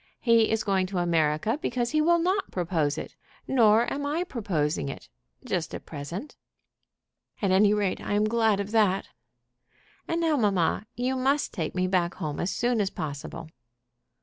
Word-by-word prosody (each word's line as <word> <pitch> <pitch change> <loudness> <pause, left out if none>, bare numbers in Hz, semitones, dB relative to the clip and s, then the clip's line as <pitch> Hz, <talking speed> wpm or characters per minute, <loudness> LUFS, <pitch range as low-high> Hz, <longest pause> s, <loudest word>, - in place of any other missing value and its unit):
He 230 -2 +4
is 220 0 0
going 190 -2 +1
to 190 0 -4
America 170 - +1
because 240 -1 -1
he 310 - +2
will 340 +2 +4
not 370 +4 0
propose 165 -5 -1
it. - - -7 0.3
Nor 230 -3 +4
am 285 - -3
I 300 +5 -1
proposing 170 - -2
it, - - -9 0.4
just - - -2
at - - -8
present." 170 - -7 1.0
"At 195 -3 +1
any 200 +2 +5
rate 205 -3 0
I - - -3
am 210 +1 +3
glad 220 -2 +2
of 200 +1 -4
that." 205 -4 +2 1.0
"And 330 - -1
now, 320 -3 +2
mamma, 200 -3 +1
you 255 +2 -1
must 270 +3 +1
take 165 -4 -3
me 185 0 +1
back 180 -2 0
home 150 -2 -4
as 175 - -1
soon 240 0 +1
as 195 - 0
possible." 155 +2 -6
205 Hz, 170 wpm, -27 LUFS, 175-245 Hz, 1.0 s, any